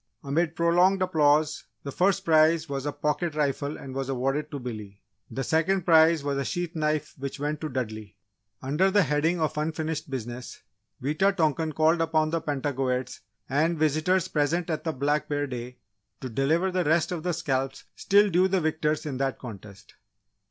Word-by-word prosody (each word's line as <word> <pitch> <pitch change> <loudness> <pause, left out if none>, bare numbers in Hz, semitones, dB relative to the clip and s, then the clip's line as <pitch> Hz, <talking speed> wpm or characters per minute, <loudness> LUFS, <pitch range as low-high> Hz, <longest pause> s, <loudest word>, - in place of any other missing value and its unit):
Amid 160 +4 0
prolonged 180 +3 +3
applause, 155 -3 +2 0.2
the 140 - -5
first 190 +6 +1
prize 160 0 +4
was 140 0 -4
a - - 0
pocket 150 +2 -2
rifle 145 0 -1
and 130 - -9
was 135 0 -3
awarded 135 +3 -1
to 145 - -5
Billy. 110 -6 -7 0.3
The 135 - -3
second 165 +6 +1
prize 160 -2 +5
was 140 -1 -1
a - - -1
sheath 175 +3 -3
knife 155 -1 -1
which 140 +1 -5
went 150 +1 -2
to 155 - -3
Dudley. 110 -5 -5 0.5
Under 150 +9 +2
the 205 0 +4
heading 160 +3 +1
of 155 -1 -1
"unfinished 155 0 -3
business" 120 -1 -6 0.4
Wita 185 +8 +2
tonkan 160 -3 0
called 160 +1 +3
upon 155 -1 +1
the 165 0 0
Pentagoets 130 -3 -2 0.3
and 160 +5 +1
visitors 155 +4 +1
present 165 +2 0
at 155 - -3
the 160 - 0
Black 150 +2 -1
Bear 145 -1 0
Day, 125 -1 -7 0.4
to 130 - -6
deliver 155 +10 +1
the 180 0 0
rest 160 +2 +2
of 175 -3 -3
the 180 +2 -1
scalps 135 -5 -2
still 205 0 +3
due 180 +2 +4
the 190 0 +1
victors 155 -2 -1
in 140 -4 -3
that 135 0 -1
contest. 105 -3 -11
150 Hz, 175 wpm, -26 LUFS, 135-165 Hz, 0.5 s, prize